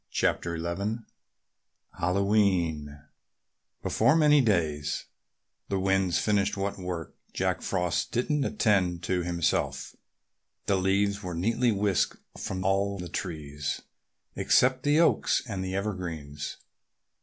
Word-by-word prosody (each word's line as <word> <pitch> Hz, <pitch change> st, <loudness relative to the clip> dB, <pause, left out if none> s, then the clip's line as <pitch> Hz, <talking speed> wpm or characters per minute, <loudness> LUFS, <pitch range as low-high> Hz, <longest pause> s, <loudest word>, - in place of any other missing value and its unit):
CHAPTER 85 Hz, -1 st, 0 dB
XI 100 Hz, +7 st, -3 dB, 1.0 s
HALLOWE'EN 90 Hz, -6 st, +1 dB, 0.8 s
Before 120 Hz, +7 st, +3 dB
many 150 Hz, -2 st, +6 dB
days 80 Hz, -, 0 dB, 0.6 s
the 100 Hz, -, 0 dB
winds 95 Hz, -2 st, +2 dB
finished 100 Hz, -1 st, +1 dB
what 100 Hz, 0 st, -2 dB
work 90 Hz, -3 st, -5 dB, 0.2 s
Jack -, -, 0 dB
Frost 90 Hz, -2 st, -1 dB
didn't 140 Hz, +4 st, +1 dB
attend 95 Hz, -7 st, +1 dB
to 90 Hz, +1 st, 0 dB
himself. 80 Hz, -5 st, -1 dB, 0.7 s
The 100 Hz, -, +2 dB
leaves 100 Hz, +2 st, +1 dB
were 90 Hz, -3 st, -5 dB
neatly 115 Hz, +7 st, +2 dB
whisked 100 Hz, -2 st, +1 dB, 0.2 s
from 95 Hz, 0 st, -4 dB
all 100 Hz, +1 st, +1 dB
the 90 Hz, -2 st, -6 dB
trees 75 Hz, -5 st, -4 dB, 0.5 s
except 130 Hz, 0 st, +3 dB
the 145 Hz, +3 st, +3 dB
oaks 170 Hz, -, +3 dB
and 100 Hz, -6 st, -4 dB
the 95 Hz, 0 st, -3 dB
evergreens. 85 Hz, -8 st, -4 dB
95 Hz, 110 wpm, -28 LUFS, 85-105 Hz, 1.0 s, many